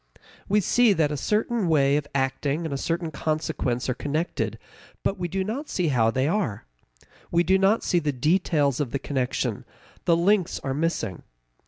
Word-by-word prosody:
We 210 Hz, +1 st, +4 dB
see 235 Hz, +2 st, +4 dB
that 155 Hz, -5 st, +1 dB
a -, -, -1 dB
certain 210 Hz, -, 0 dB
way 140 Hz, -3 st, +3 dB
of 145 Hz, -1 st, -1 dB
acting 140 Hz, +4 st, 0 dB
and 155 Hz, -, -3 dB
a -, -, -1 dB
certain 165 Hz, +1 st, -2 dB
consequence 150 Hz, -5 st, -2 dB
are 125 Hz, -, +1 dB
connected, 155 Hz, +7 st, -2 dB, 0.5 s
but 195 Hz, -, -1 dB
we 175 Hz, -, -1 dB
do 190 Hz, +2 st, -2 dB
not 250 Hz, +10 st, -4 dB
see 175 Hz, -4 st, 0 dB
how 115 Hz, -5 st, +3 dB
they 130 Hz, +4 st, 0 dB
are. 135 Hz, -, -1 dB, 0.6 s
We 170 Hz, 0 st, +3 dB
do 190 Hz, +2 st, +3 dB
not 195 Hz, +4 st, +3 dB
see 175 Hz, -, +2 dB
the 150 Hz, -3 st, -1 dB
details 145 Hz, -1 st, +1 dB
of 145 Hz, -4 st, -1 dB
the 140 Hz, -, -1 dB
connection; 130 Hz, -2 st, -2 dB, 0.4 s
the 170 Hz, -, +4 dB
links 185 Hz, +1 st, +2 dB
are 135 Hz, -, -2 dB
missing. 150 Hz, -, -2 dB
160 Hz, 180 wpm, -25 LUFS, 140-190 Hz, 0.6 s, We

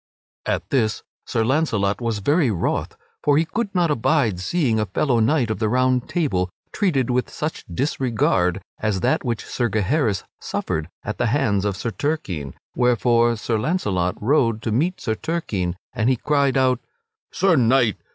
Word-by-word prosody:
At -, -, -2 dB
this 110 Hz, -5 st, +1 dB, 0.2 s
Sir 110 Hz, -, 0 dB
Launcelot 115 Hz, -7 st, +1 dB
was 115 Hz, -2 st, -1 dB
very 145 Hz, -2 st, +3 dB
wroth; 95 Hz, -6 st, -2 dB, 0.2 s
for 145 Hz, -1 st, +3 dB
he 160 Hz, -, +3 dB
could 215 Hz, +5 st, -2 dB
not 175 Hz, -3 st, +3 dB
abide 120 Hz, -, +1 dB
seeing 115 Hz, -, +1 dB
a 105 Hz, -, 0 dB
fellow 120 Hz, +5 st, +1 dB
knight 120 Hz, 0 st, +2 dB
of 105 Hz, -, -3 dB
the 110 Hz, -1 st, +1 dB
Round 130 Hz, +1 st, +1 dB
Table 95 Hz, -, 0 dB, 0.2 s
treated 140 Hz, -, +1 dB
with 125 Hz, 0 st, 0 dB
such 155 Hz, +1 st, -4 dB
disregard 100 Hz, -, 0 dB, 0.2 s
as 105 Hz, -4 st, -1 dB
that -, -, +1 dB
which 120 Hz, -3 st, -2 dB
Sir 120 Hz, -2 st, -1 dB
Gaheris 110 Hz, -, +1 dB, 0.2 s
suffered 80 Hz, +1 st, -3 dB
at 105 Hz, -, -5 dB
the 120 Hz, -, +2 dB
hands 110 Hz, -6 st, +1 dB
of 100 Hz, -2 st, -1 dB
Sir 115 Hz, -, -3 dB
Turquine; 100 Hz, -, -3 dB, 0.2 s
wherefore 120 Hz, -1 st, +3 dB
Sir 110 Hz, 0 st, -1 dB
Launcelot 105 Hz, -, 0 dB
rode 115 Hz, -2 st, +2 dB
to 110 Hz, -, -1 dB
meet 165 Hz, -, 0 dB
Sir 110 Hz, -, -1 dB
Turquine, 105 Hz, -, -2 dB, 0.2 s
and 120 Hz, -1 st, +1 dB
he 130 Hz, -, +3 dB
cried 140 Hz, +1 st, +1 dB
out: 130 Hz, -2 st, +3 dB, 0.5 s
"Sir 190 Hz, -3 st, +3 dB
Knight! 125 Hz, -3 st, +3 dB
120 Hz, 165 wpm, -22 LUFS, 105-145 Hz, 0.5 s, very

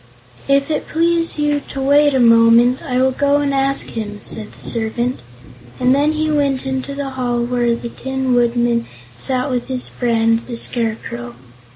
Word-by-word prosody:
"If 275 Hz, +2 st, +2 dB
it 300 Hz, -, -2 dB
please 335 Hz, 0 st, +1 dB
you 295 Hz, -1 st, 0 dB
to 275 Hz, -, -6 dB
wait 285 Hz, +1 st, +3 dB
a -, -, +2 dB
moment, 230 Hz, +1 st, +5 dB
I 250 Hz, -2 st, -3 dB
will 260 Hz, 0 st, +3 dB
go 285 Hz, +2 st, +1 dB
and 285 Hz, -1 st, 0 dB
ask 275 Hz, 0 st, 0 dB
him," 210 Hz, -2 st, -5 dB
said 215 Hz, 0 st, -5 dB
the -, -, -17 dB
servant, 235 Hz, +2 st, -1 dB, 0.6 s
and 255 Hz, 0 st, +3 dB
then 290 Hz, +3 st, +2 dB
he 310 Hz, 0 st, -1 dB
went 280 Hz, -3 st, 0 dB
into 265 Hz, +1 st, -3 dB
the 280 Hz, -1 st, -4 dB
hall 245 Hz, -2 st, -1 dB
where 240 Hz, -1 st, 0 dB
the 235 Hz, -, -6 dB
Tin 265 Hz, +1 st, -3 dB
Woodman 240 Hz, -1 st, +1 dB, 0.3 s
sat 260 Hz, -, +1 dB
with 245 Hz, -1 st, -2 dB
his 255 Hz, -1 st, -2 dB
friend 230 Hz, -1 st, +1 dB
the 240 Hz, -2 st, -6 dB
Scarecrow. 215 Hz, -, -1 dB
255 Hz, 175 wpm, -18 LUFS, 235-280 Hz, 0.6 s, moment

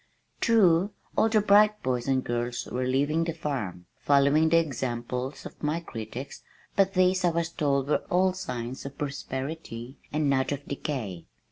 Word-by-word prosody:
True, 200 Hz, -4 st, +4 dB, 0.2 s
all 225 Hz, -, +4 dB
the 215 Hz, -1 st, +4 dB
bright 210 Hz, +1 st, +5 dB
boys 125 Hz, -1 st, -1 dB
and 130 Hz, -1 st, +2 dB
girls 120 Hz, 0 st, -2 dB
were 125 Hz, +1 st, -2 dB
leaving 145 Hz, +5 st, +2 dB
the 165 Hz, -1 st, -3 dB
farm, 110 Hz, -, -4 dB
following 145 Hz, +3 st, +4 dB
the 165 Hz, -, +5 dB
example 125 Hz, -4 st, -1 dB
of 135 Hz, -, -11 dB
my 150 Hz, +2 st, 0 dB
critics, 120 Hz, -2 st, -7 dB, 0.3 s
but 195 Hz, 0 st, +3 dB
these 185 Hz, 0 st, +3 dB
I 175 Hz, -, +5 dB
was 165 Hz, 0 st, -1 dB
told 140 Hz, -4 st, 0 dB
were 150 Hz, -, +2 dB
all 185 Hz, +1 st, +3 dB
signs 130 Hz, -10 st, -5 dB
of 140 Hz, 0 st, -8 dB
prosperity 135 Hz, -3 st, -5 dB
and 150 Hz, 0 st, +1 dB
not 130 Hz, -1 st, +2 dB
of 145 Hz, 0 st, -4 dB
decay. 120 Hz, -, -4 dB
145 Hz, 160 wpm, -27 LUFS, 130-170 Hz, 0.3 s, bright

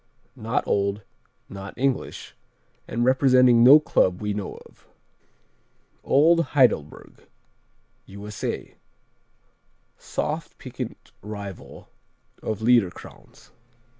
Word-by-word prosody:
_ -, -, -15 dB
Not 115 Hz, +2 st, -1 dB
old, 100 Hz, +1 st, -1 dB, 0.4 s
not 95 Hz, 0 st, -10 dB
English, 135 Hz, 0 st, -3 dB, 0.5 s
and 120 Hz, +1 st, -1 dB
representing 125 Hz, -2 st, +4 dB
no 140 Hz, +5 st, +9 dB
club 90 Hz, -11 st, +1 dB
we 105 Hz, -1 st, -3 dB
know 100 Hz, -1 st, -5 dB
of. -, -, -22 dB, 1.2 s
Old 165 Hz, +4 st, +4 dB
Heidelberg 105 Hz, -, 0 dB, 0.8 s
U.S.A. 100 Hz, +1 st, -6 dB, 1.2 s
Soft, -, -, -4 dB
piquant -, -, -8 dB
rival 100 Hz, -3 st, -9 dB, 0.5 s
of 110 Hz, -1 st, -4 dB
Liederkranz. 115 Hz, -6 st, -1 dB
110 Hz, 85 wpm, -24 LUFS, 100-130 Hz, 1.2 s, no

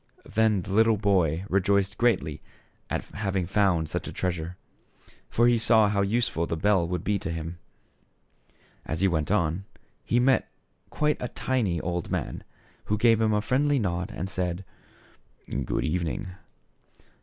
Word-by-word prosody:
Then 110 Hz, -4 st, +2 dB
the 95 Hz, -, -5 dB
little 110 Hz, +1 st, +4 dB
boy 95 Hz, -4 st, +1 dB
rejoiced 100 Hz, +1 st, +2 dB
greatly 120 Hz, -1 st, +1 dB, 0.5 s
at -, -, -2 dB
having 95 Hz, -3 st, -2 dB
found 95 Hz, -4 st, +2 dB
such -, -, -4 dB
a -, -, -5 dB
treasure; 90 Hz, -1 st, -3 dB, 0.7 s
for 120 Hz, -, +3 dB
he 120 Hz, -1 st, +4 dB
saw 110 Hz, -2 st, +5 dB
how 100 Hz, -1 st, +1 dB
useful 100 Hz, -5 st, 0 dB
the 85 Hz, -, -2 dB
bell 95 Hz, -1 st, +2 dB
would 90 Hz, -1 st, -3 dB
be 105 Hz, -1 st, 0 dB
to 100 Hz, -, -5 dB
him. 80 Hz, +1 st, -5 dB, 1.2 s
As 80 Hz, +2 st, -3 dB
he 95 Hz, -, +5 dB
went 80 Hz, -5 st, 0 dB
on, 90 Hz, -2 st, 0 dB, 0.4 s
he 120 Hz, -, +1 dB
met 130 Hz, +1 st, +3 dB, 0.4 s
quite 150 Hz, 0 st, 0 dB
a 125 Hz, -, -1 dB
tiny 115 Hz, -9 st, -1 dB
old 85 Hz, 0 st, -3 dB
man, -, -, -3 dB, 0.4 s
who 105 Hz, -, 0 dB
gave 115 Hz, 0 st, +4 dB
him 110 Hz, -1 st, +3 dB
a 105 Hz, 0 st, +2 dB
friendly 140 Hz, +6 st, +2 dB
nod 90 Hz, -6 st, -1 dB
and 90 Hz, -, -4 dB
said, 90 Hz, -1 st, -3 dB, 0.5 s
" 65 Hz, +2 st, -7 dB
Good -, -, -1 dB
evening." 85 Hz, +4 st, -2 dB
100 Hz, 155 wpm, -27 LUFS, 85-110 Hz, 1.2 s, saw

